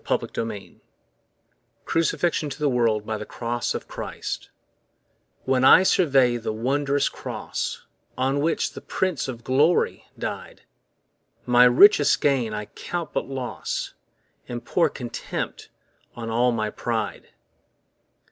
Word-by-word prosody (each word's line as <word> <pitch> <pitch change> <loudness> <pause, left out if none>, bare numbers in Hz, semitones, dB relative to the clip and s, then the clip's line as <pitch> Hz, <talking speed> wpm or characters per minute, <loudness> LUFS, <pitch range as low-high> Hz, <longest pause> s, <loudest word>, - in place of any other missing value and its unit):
Isaac - - -1
Watts 110 -3 -4 1.2
Crucifixion 165 -1 0
to 135 - -7
the 150 -1 0
World 115 -4 +1
by 110 -1 -3
the - - -4
Cross 120 0 -3
of - - -5
Christ - - -6 1.0
WHEN 130 -1 +2
I 155 +7 +8
survey 135 -10 +3
the 115 - -3
wondrous 140 +5 0
cross - - -5 0.3
On 135 +2 +1
which 160 +3 0
the - - -8
Prince 185 -9 -1
of 120 -3 -7
Glory 145 +8 +2
died, - - -6 0.8
My 125 0 +6
richest 145 +5 +6
gain 135 -6 +1
I 105 0 -4
count 170 +7 -6
but - - -2
loss 130 -2 -4 0.5
And 120 -1 -6
pour 175 - +2
contempt 120 -3 -5 0.5
on 115 -1 -5
all 120 +2 +3
my 110 -2 -1
pride. 115 -2 -3
125 Hz, 125 wpm, -24 LUFS, 115-145 Hz, 1.2 s, I